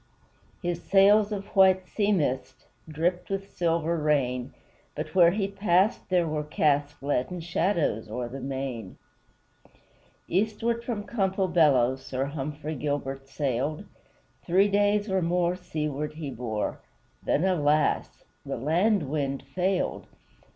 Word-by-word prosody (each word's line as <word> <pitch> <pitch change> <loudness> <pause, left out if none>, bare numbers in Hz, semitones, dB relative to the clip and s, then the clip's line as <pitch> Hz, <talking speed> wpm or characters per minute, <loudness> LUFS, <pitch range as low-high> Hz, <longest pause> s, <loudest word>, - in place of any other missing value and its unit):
His 175 -1 -2
sails 205 +2 +5
of 200 -1 -3
white 190 -1 +5
sea 205 +1 0
mist 130 -7 -1 0.2
Dripped 170 +4 -1
with 195 0 -4
silver 170 -1 +1
rain; 130 -4 0 0.4
But - - -5
where 175 -2 +7
he 195 +2 -1
passed 195 0 +1
there 180 -2 +2
were 155 -1 -2
cast 145 -1 0
Leaden 145 +5 -1
shadows 170 - 0
o'er 120 +2 -3
the 130 +3 -7
main. 130 -6 -5 1.3
Eastward 220 +4 0
from 225 -4 -3
Campobello 175 - +2
Sir 130 0 -3
Humphrey 150 +2 -5
Gilbert 135 -2 -3
sailed; 140 - -2 0.6
Three 190 +4 +3
days 205 +1 +2
or 190 -2 +1
more 175 +1 +1
seaward 150 -4 -4
he 150 -3 -6
bore, 110 -4 -3 0.4
Then, 155 - +1
alas! 155 -5 +1 0.2
the - - -4
land 170 - +2
wind 140 -1 -2
failed. 185 +1 -1
160 Hz, 125 wpm, -27 LUFS, 140-190 Hz, 1.3 s, where